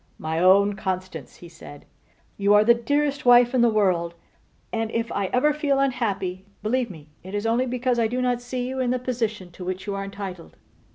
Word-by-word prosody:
'My 160 Hz, +1 st, -3 dB
own 200 Hz, +3 st, +5 dB
Constance,' 185 Hz, -7 st, -5 dB
he 175 Hz, -, -13 dB
said, 145 Hz, -3 st, -13 dB, 0.5 s
'you 200 Hz, +1 st, +3 dB
are 210 Hz, -, +6 dB
the 235 Hz, +2 st, +6 dB
dearest 285 Hz, +4 st, -1 dB
wife 245 Hz, 0 st, +6 dB
in 255 Hz, -, +3 dB
the 240 Hz, -, +5 dB
world; 180 Hz, -6 st, +1 dB, 0.6 s
and 225 Hz, -1 st, -1 dB
if 230 Hz, +1 st, -2 dB
I 200 Hz, -1 st, -1 dB
ever 255 Hz, +8 st, +2 dB
feel 290 Hz, -2 st, 0 dB
unhappy, 205 Hz, -8 st, -1 dB, 0.2 s
believe 240 Hz, +2 st, 0 dB
me 155 Hz, -5 st, -12 dB
it 190 Hz, +3 st, -8 dB
is 205 Hz, +1 st, -2 dB
only 235 Hz, +3 st, +1 dB
because 250 Hz, 0 st, 0 dB
I 230 Hz, -, +3 dB
do 245 Hz, +3 st, -3 dB
not 250 Hz, -1 st, 0 dB
see 245 Hz, 0 st, -4 dB
you 260 Hz, +1 st, -4 dB
in 255 Hz, -1 st, 0 dB
the 255 Hz, -, +1 dB
position 225 Hz, -7 st, -3 dB
to 180 Hz, -, -10 dB
which 185 Hz, +1 st, -4 dB
you 205 Hz, -, -3 dB
are 195 Hz, 0 st, -3 dB
entitled. 195 Hz, -3 st, -8 dB
220 Hz, 210 wpm, -24 LUFS, 190-250 Hz, 0.6 s, are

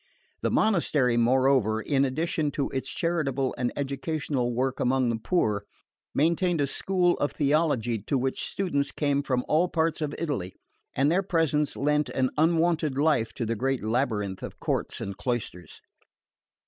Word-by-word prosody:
The -, -, +1 dB
monastery, 155 Hz, -, +2 dB
moreover, 125 Hz, -2 st, +3 dB
in 140 Hz, +3 st, +1 dB
addition 155 Hz, +2 st, -1 dB
to 140 Hz, -, -2 dB
its 135 Hz, -1 st, -3 dB
charitable 140 Hz, -6 st, -1 dB
and 120 Hz, -1 st, -1 dB
educational 140 Hz, -2 st, -2 dB
work 130 Hz, +2 st, -1 dB
among 130 Hz, 0 st, +2 dB
the 115 Hz, -, 0 dB
poor, 110 Hz, -, 0 dB, 0.5 s
maintained 170 Hz, +3 st, +2 dB
a 145 Hz, -, +3 dB
school 180 Hz, +5 st, +1 dB
of 145 Hz, -, 0 dB
theology 140 Hz, -6 st, +1 dB
to 140 Hz, -, +1 dB
which 130 Hz, +1 st, -1 dB
students 145 Hz, -7 st, -1 dB
came 145 Hz, -2 st, 0 dB
from 130 Hz, -3 st, -1 dB
all 160 Hz, +4 st, +3 dB
parts 160 Hz, -1 st, 0 dB
of 150 Hz, -1 st, -2 dB
Italy; 130 Hz, -, -3 dB, 0.4 s
and 140 Hz, +3 st, +3 dB
their 180 Hz, +3 st, +3 dB
presence 160 Hz, -6 st, 0 dB
lent 150 Hz, +1 st, +1 dB
an 130 Hz, -1 st, 0 dB
unwonted 160 Hz, -2 st, +2 dB
life 145 Hz, -6 st, +2 dB
to 120 Hz, -, -2 dB
the 115 Hz, +1 st, -1 dB
great 135 Hz, +2 st, -1 dB
labyrinth 110 Hz, -5 st, -1 dB
of -, -, -8 dB
courts -, -, -2 dB
and 100 Hz, -1 st, -5 dB
cloisters. 105 Hz, -6 st, -4 dB
140 Hz, 155 wpm, -27 LUFS, 125-160 Hz, 0.5 s, moreover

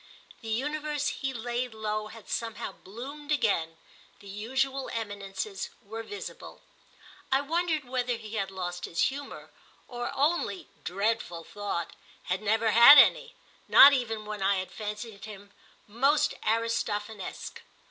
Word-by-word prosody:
The 225 Hz, -, -10 dB
universe 295 Hz, +5 st, -1 dB
he 270 Hz, -1 st, -3 dB
laid 240 Hz, 0 st, -3 dB
low 215 Hz, 0 st, -2 dB
had 220 Hz, -1 st, -13 dB
somehow 225 Hz, -3 st, -3 dB
bloomed 270 Hz, +11 st, -9 dB
again—the 200 Hz, -, -2 dB
usual 265 Hz, +7 st, -2 dB
eminences 200 Hz, -2 st, -4 dB
were 225 Hz, 0 st, -7 dB
visible. 415 Hz, -, -9 dB, 0.7 s
I 270 Hz, +1 st, +4 dB
wondered 320 Hz, 0 st, -1 dB
whether 245 Hz, -1 st, -1 dB
he 220 Hz, -1 st, -10 dB
had 195 Hz, -3 st, -1 dB
lost 180 Hz, -2 st, -5 dB
his 170 Hz, -, -6 dB
humour, 280 Hz, +1 st, -8 dB, 0.4 s
or 240 Hz, -1 st, -4 dB
only, 285 Hz, -, 0 dB, 0.2 s
dreadful 195 Hz, -3 st, -1 dB
thought, 185 Hz, -3 st, -4 dB, 0.3 s
had 185 Hz, +2 st, -2 dB
never 220 Hz, +1 st, +2 dB
had 235 Hz, +7 st, +10 dB
any—not -, -, +6 dB
even 225 Hz, -5 st, -1 dB
when 210 Hz, -1 st, -6 dB
I 195 Hz, +1 st, +3 dB
had 185 Hz, 0 st, -4 dB
fancied 210 Hz, -1 st, -6 dB
him 205 Hz, -2 st, -11 dB, 0.4 s
most 280 Hz, +7 st, +2 dB
Aristophanesque. 220 Hz, -3 st, -2 dB
225 Hz, 125 wpm, -28 LUFS, 205-265 Hz, 0.7 s, had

